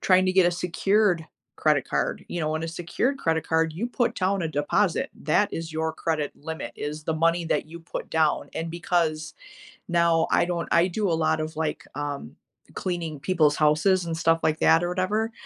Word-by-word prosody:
trying 185 0 +4
to 185 - +2
get 185 -1 +5
a - - +3
secured 180 0 +1 0.3
credit - - +2
card, - - -1
you 175 - -3
know, 155 0 -1
on 160 - -2
a 165 - -4
secured 175 +11 -1
credit 160 - 0
card, 160 0 +2
you 205 +9 -3
put 245 -1 0
down 190 -1 0
a 160 - -1
deposit. 145 -1 +1
That - - +2
is 165 -1 -5
your 160 0 -1
credit 155 -3 -2
limit, 160 +2 -6
is 150 +1 -5
the 160 - -1
money 170 +1 +1
that 160 - 0
you 170 +1 -9
put 165 - -7
down. 160 -2 +1
And 165 +1 -3
because 165 -2 -1 0.5
now 170 -2 +3
I - - +4
don't 175 -1 -2
I 170 +2 +4
do 195 +1 -1
a 165 - 0
lot 160 0 +2
of, 155 +1 -4
like, 155 -1 -2
um, 145 - -5 0.4
cleaning 165 -5 -3
people's 155 -2 +2
houses 160 +5 +3
and 165 -1 -2
stuff 165 0 +2
like 155 0 +1
that 165 +1 +5
or - - -1
whatever, 210 +5 0
165 Hz, 200 wpm, -25 LUFS, 160-180 Hz, 0.5 s, get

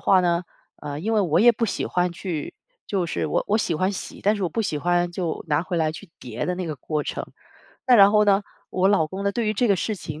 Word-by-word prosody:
话 190 -1 +4
呢， 175 0 +1 0.4
呃， 145 0 -5
因 220 +6 -2
为 215 - +3
我 170 -4 +2
也 240 +1 +7
不 230 +1 -1
喜 - - -2
欢 180 0 0
去 170 -4 -5 0.3
就 190 -4 -1
是 85 - -2
我 75 - 0
我 210 - +3
喜 170 -6 0
欢 185 +4 +1
洗， - - -7
但 210 +2 +3
是 200 - -4
我 175 - +1
不 225 - -2
喜 150 -7 -2
欢 175 +2 +1
就 170 -3 -3
拿 150 +2 +2
回 180 -1 -3
来 155 -1 +1
去 185 +2 -11
叠 120 -2 -5
的 180 - -1
那 185 - -3
个 155 - -3
过 150 +3 -3
程。 - - -4 0.6
那 250 - +7
然 200 -3 +8
后 210 0 +4
呢， 200 0 +3 0.3
我 185 +1 +2
老 195 -6 +3
公 190 +4 -6
呢， 200 - +1
对 230 0 -1
于 215 - 0
这 240 +2 +1
个 200 - +4
事 215 - -2
情， 155 -5 -8
180 Hz, 290 characters per minute, -24 LUFS, 160-205 Hz, 0.6 s, 然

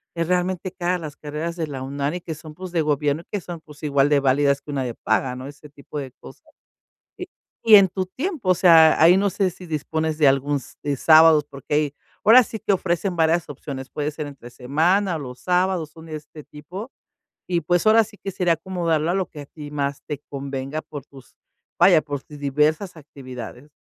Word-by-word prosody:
es 165 -1 -1
realmente 180 0 -1
caras 180 -1 -1
las 150 -3 -8
carreras 155 +3 -5
de 165 -2 -2
la 135 -3 -6
UNAM 140 +3 -3
y - - -3
que 160 -2 -6
son, 155 0 -12
pues, 180 +1 -8
de 165 - +2
gobierno 150 0 0
y - - -43
que 205 - -1
son, 170 -2 -8
pues, 150 -2 -16
igual 140 -1 +2
de 145 - +4
válidas 140 +1 +2
que 145 - -9
una 135 -2 -1
de 120 - -4
paga, 125 +3 0
¿no? 130 +1 -7
Ese 145 +1 -13
tipo 145 +1 -10
de 135 -2 -6
cosas, - - -14 0.8
y 365 - -5 0.4
y 220 -2 +7
en 195 -2 +6
tu 185 +1 -3
tiempo, 265 - -3
o - - +6
sea, 165 -3 +6
ahí 170 +3 +7
no 200 +1 +2
sé 190 0 0
si 180 +1 -12
dispones 160 0 -2
de 150 -3 +5
algún 140 +2 +1
s - - -14
de 145 - -1
sábados, 155 0 +6
porque 140 +1 -5
ahí, 150 -1 +1 0.3
ahora 240 +4 +8
sí 220 0 -7
que 200 - 0
ofrecen 180 0 -1
varias 165 +1 +2
opciones, 135 -1 -7
puede 150 0 -3
ser 150 -1 -6
entre 135 -4 -12
semana 165 +10 +1
o - - -4
los 125 -3 -8
sábados, 180 -3 0
son 160 +1 -14
de 160 - -8
este 150 0 -12
tipo, 180 - -9 0.6
y, 175 -2 +1
pues, 175 +5 +1
ahora 225 +1 +6
sí 205 0 -16
que 195 - -3
sería 180 -2 +1
acomodarlo 165 -2 -1
a - - 0
lo 190 -1 0
que 150 - -10
a 145 - -9
ti 150 0 -11
más 140 -1 -2
te 150 -3 -4
convenga 140 +1 -5
por 145 -3 -9
tus 135 -3 -17 0.5
vaya, 175 -5 +6
por 145 -2 -5
ti 150 - -12
diversas 150 +6 0
actividades. 135 -2 -10
155 Hz, 220 wpm, -22 LUFS, 145-180 Hz, 0.8 s, ahora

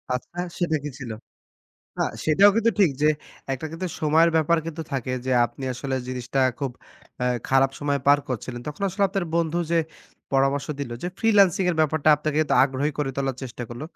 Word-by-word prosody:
আচ্ছা, 170 +7 -8 0.2
সেটা 170 -3 +1
কি 150 - -3
ছিল? 125 -4 -6 0.9
না, - - +2 0.2
সেটাও 195 +7 +6
কিন্তু 230 +1 +3
ঠিক 185 -7 +5
যে 150 - +5 0.4
একটা 135 +4 -3
কিন্তু 175 +3 -4
সময়ের 160 +2 +4
ব্যাপার 160 +1 +3
কিন্তু 165 0 -5
থাকে 130 -1 -2
যে, - - 0 0.2
আপনি 135 - -9
আসলে 130 +2 -4
জিনিসটা 130 +1 -2 0.2
খুব 135 -3 -2 0.5
অ্যা 125 - +1 0.2
খারাপ 135 0 +4
সময়ে 145 -1 -1
পার 145 0 +6
করছিলেন। 120 0 -4
তখন 150 +6 -6
আসলে 190 +2 -2
আপনার 190 -1 -2
বন্ধু 170 0 +1
যে, 170 - +3 0.6
পরামর্শ 135 +1 +2
দিলো 120 -4 -4
যে, - - -2
ফ্রিল্যান্সিংয়ের 195 -5 +3
ব্যাপারটা 155 0 +2
আপনাকে 150 +1 -1 0.2
আগ্রহী 140 +2 -1
করে 145 -2 0
তোলার 135 -2 -1
চেষ্টা 125 -1 -6
করল। 120 +4 -8
150 Hz, 175 wpm, -24 LUFS, 135-165 Hz, 0.9 s, সেটাও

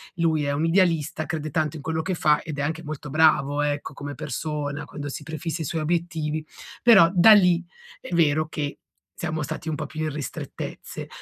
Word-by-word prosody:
lui 160 -3 +1
è 140 - 0
un 150 +3 -1
idealista, 165 -3 +2
crede 155 -3 -3
tanto 155 0 -1
in - - -9
quello 160 +2 -2
che 185 - -1
fa 150 -3 +3
ed 155 -3 -6
è - - 0
anche 160 +3 -2
molto 150 -1 -6
bravo, 145 -1 +3
ecco, 145 0 -2
come 145 +1 -7
persona, 145 0 -4
quando 145 0 -6
si 145 - -6
prefissa 160 +2 -4
i - - -2
suoi 160 +3 -2
obiettivi 155 -2 -1 0.4
però 200 -9 +7
da 195 +5 +8
lì 180 -4 +5 0.4
è 180 - -8
vero 155 -2 +3
che 150 -2 -4 0.4
siamo 155 -2 -3
stati 160 - -5
un 155 - -1
po' 155 - -4
più 155 +2 -6
in 155 - 0
ristrettezze. 150 -2 -6
155 Hz, 200 wpm, -25 LUFS, 145-165 Hz, 0.4 s, da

